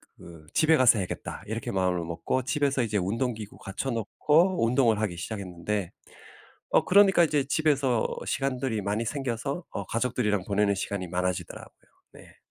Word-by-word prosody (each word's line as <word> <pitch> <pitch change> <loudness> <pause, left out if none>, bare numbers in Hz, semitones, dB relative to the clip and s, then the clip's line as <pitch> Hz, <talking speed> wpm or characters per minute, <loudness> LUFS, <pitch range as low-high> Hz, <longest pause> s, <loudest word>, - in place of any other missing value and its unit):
그 85 -3 -13
집에 160 0 +4
가서 120 -5 +5
해야겠다.' 90 - -5
이렇게 110 +1 -4
마음을 90 -2 0
먹고 85 +10 -2
집에서 140 -1 +1
이제 105 -2 -1
운동기구 110 +2 -2
갖춰 100 +7 -5
놓고 150 - +2
운동을 115 -2 +3
하기 95 -6 -2
시작했는데 95 0 -4 0.8
어 - - +4
그러니까 190 -3 +6
이제 150 -3 +1
집에서 140 -7 +2 0.2
시간들이 130 -5 -1
많이 105 +3 -1
생겨서 140 +5 -3
어 100 - -5
가족들이랑 115 -5 0
보내는 100 0 +2
시간이 95 -1 -3
많아지더라고요. 90 0 -3 0.4
네. - - -16
115 Hz, 380 characters per minute, -27 LUFS, 100-135 Hz, 0.8 s, 그러니까